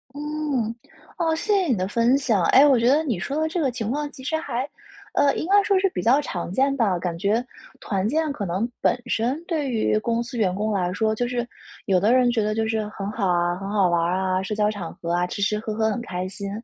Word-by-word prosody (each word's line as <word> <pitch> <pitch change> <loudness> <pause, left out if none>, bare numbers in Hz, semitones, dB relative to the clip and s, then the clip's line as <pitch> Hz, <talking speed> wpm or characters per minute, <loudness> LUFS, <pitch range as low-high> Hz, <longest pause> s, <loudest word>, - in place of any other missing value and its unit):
嗯， 295 -6 -2 0.5
哦， 325 -2 +1
谢 415 +6 0
谢 385 -3 +2
你 255 - +2
的 185 -1 -1
分 235 +5 +3
享。 225 -10 +1
诶， 275 +2 +7
我 270 -4 +5
觉 235 - +2
得 300 +4 +4
你 235 - -2
说 280 - -2
的 315 - +1
这 335 +2 -2
个 275 - +2
情 230 -3 -3
况 295 +1 -2
其 260 - -12
实 305 +4 -1
还， 265 -4 -3 0.5
呃， 280 -1 +3
应 315 - -3
该 405 +2 +5
说 395 -1 +3
是 390 - +3
比 - - -2
较 250 +5 +4
常 180 -12 -4
见 270 +7 +2
吧。 215 -8 +1
感 170 -1 -3
觉 210 +7 0 0.3
团 195 -2 -1
建 315 0 0
可 205 - -5
能 190 +5 -1
本 245 - +2
身 245 +5 0
对 310 -6 -1
于 215 -2 +1
公 230 +1 -1
司 245 +2 -9
员 200 -6 +1
工 215 +2 -1
来 180 -3 0
说 220 +3 0
就 245 +3 -1
是 240 -1 -2 0.4
有 185 -2 +3
的 210 +5 +3
人 250 -1 +4
觉 230 - +1
得 215 0 -1
就 220 0 0
是 220 -1 -1
很 200 -1 -5
好 210 -3 -1
啊， 175 0 +1
很 195 +1 -6
好 200 -3 +3
玩 170 -1 +2
儿 175 +2 0
啊， 185 0 0
社 205 +2 -3
交 210 0 +2
场 190 -6 -6
合 170 - -5
啊， 175 0 +1
吃 200 +2 -3
吃 210 +1 +1
喝 215 -1 -4
喝 220 0 +1
很 235 - -3
开 185 -5 -4
心。 200 +1 -6
225 Hz, 280 characters per minute, -23 LUFS, 195-275 Hz, 0.5 s, 诶